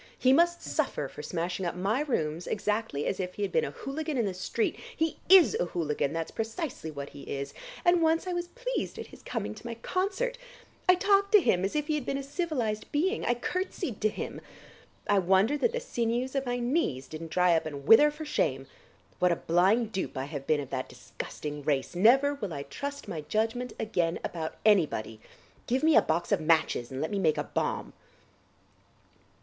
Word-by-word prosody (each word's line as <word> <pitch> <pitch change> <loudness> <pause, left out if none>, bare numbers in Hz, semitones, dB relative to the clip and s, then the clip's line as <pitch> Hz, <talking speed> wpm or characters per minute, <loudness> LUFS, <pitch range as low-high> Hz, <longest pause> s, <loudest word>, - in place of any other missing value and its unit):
He 260 0 +4
must 345 +3 +3
suffer - - -1
for - - -9
smashing 175 +2 -3
up 175 - -2
my 200 +7 0
rooms 165 - -1
exactly 210 -8 -1
as 195 - -1
if 180 -1 -3
he 205 - -3
had 200 - -1
been 475 - +2
a - - -2
hooligan 300 +1 -4
in 235 - +2
the 195 - -2
street. 185 +5 -1 0.2
He 320 0 0
is 375 -3 +8
a - - +2
hooligan; 150 -5 -1
that's 165 0 -3
precisely 225 - -4
what 140 -2 -6
he 140 - -11
is, 140 0 -5 0.3
and 350 -1 +5
once 325 +1 +2
I 365 - -2
was 350 0 -2
pleased - - -4
at - - -5
his - - -15
coming 230 -5 -4
to 215 - -13
my 230 - -4
concert. 395 - -2 0.5
I 365 - +9
talked 400 +1 +3
to 420 - +10
him 190 - +2
as 195 - -1
if 300 -1 +1
he 310 - -1
had 295 -5 -2
been 275 - 0
a 275 - -4
civilised 275 - -2
being, 375 +9 +1
I 240 - +2
curtsied 355 - -3
to 215 - +3
him. - - -6 0.7
I 205 -1 +4
wonder 190 +8 +3
that 470 - +2
the 485 - -2
sinews 245 - -1
of 270 -2 -1
my 245 0 0
knees 240 - 0
didn't 160 +1 -7
dry 180 0 +4
up 160 -1 0
and 140 -2 -7
wither 260 - +8
for 300 +1 -7
shame. 135 - 0 0.5
What 180 0 +4
a - - +3
blind 195 +8 +2
dupe 190 -9 -3
I 130 - -2
have 145 -2 -7
been 155 -2 +2
of 140 - -9
that 130 -1 -3
disgusting 150 -1 -7
race! 140 -2 -1
Never 265 +10 +5
will 205 - -5
I 140 - -4
trust 280 - -6
my 170 -6 -4
judgment 225 +8 -1
again 175 -6 0
about 160 -2 -4
anybody.... 150 - +2 0.5
Give 255 +4 +1
me 320 0 +5
a - - +8
box 165 +2 -1
of - - +3
matches 155 -6 +2
and 130 +1 -5
let 160 - -2
me 200 - 0
make 160 -5 +2
a - - 0
bomb." - - -2
220 Hz, 210 wpm, -29 LUFS, -, 0.7 s, to